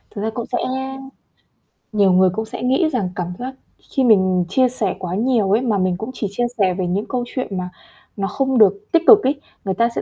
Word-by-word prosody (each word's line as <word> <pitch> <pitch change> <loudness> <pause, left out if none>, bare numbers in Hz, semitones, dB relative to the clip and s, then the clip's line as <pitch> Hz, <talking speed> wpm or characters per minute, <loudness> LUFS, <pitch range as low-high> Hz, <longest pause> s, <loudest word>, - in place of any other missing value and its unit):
Thực 200 - -4
ra 220 - -1
cũng 235 - -4
sẽ 245 - 0 1.3
nhiều 200 -3 +3
người 185 0 +5
cũng 220 +2 -3
sẽ 235 +1 -7
nghĩ 270 +6 +2
rằng 200 -7 0
cảm 180 0 -4
giác 260 +1 -6 0.4
khi 265 - +1
mình 185 -6 +3
chia 255 +4 +3
sẻ 220 -6 -2
quá 180 0 -4
nhiều 225 -3 +1
ấy, 220 +4 +3
mà 225 -5 0
mình 185 -1 0
cũng 220 +5 -6
chỉ 210 - -3
chia 240 +3 -1
sẻ 190 -3 +2
về 180 -1 -2
những 195 +4 -1
câu 250 -1 -1
chuyện 245 -8 -4
mà 180 0 -4 0.5
nó 195 0 -1
không 265 +4 0
được 200 -1 +3
tích 335 0 +3
cực 425 -2 +8
ấy, 280 +2 0 0.2
người 190 - 0
ta 230 +5 +2
sẽ - - -1
215 Hz, 235 wpm, -20 LUFS, 190-250 Hz, 1.3 s, cực